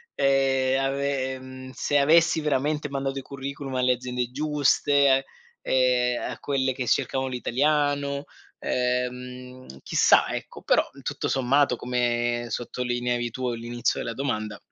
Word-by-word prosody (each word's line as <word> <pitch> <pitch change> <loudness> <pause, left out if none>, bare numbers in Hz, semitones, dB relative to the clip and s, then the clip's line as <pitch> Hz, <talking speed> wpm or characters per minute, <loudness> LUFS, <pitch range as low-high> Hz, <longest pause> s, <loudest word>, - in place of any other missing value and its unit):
ehm, 135 -1 +2
ave 135 -1 -1
ehm, 130 0 -9
se 145 - +1
avessi 160 +3 +4
veramente 150 0 0
mandato 135 -1 -3
i - - -7
curriculum 140 0 -6
alle 125 0 +3
aziende 125 0 -3
giuste 145 0 +1
e 140 0 +5
a, 135 0 +4 1.0
ehm, - - -4
a - - -8
quelle 135 -2 0
che 125 -1 -4
cercavano 130 +3 +1
l'italiano 140 +2 0 0.4
ehm, 125 0 -3 0.2
chissà" - - +4
Ecco - - -6
però - - +3 0.2
tutto - - -3
sommato, 135 +1 +2
come 120 -1 -1
sottolineavi 120 +1 -2
tu 130 +2 -3
all'inizio 120 0 -2
della 115 - -3
domanda, 110 -5 -3
130 Hz, 130 wpm, -25 LUFS, 125-140 Hz, 1.0 s, e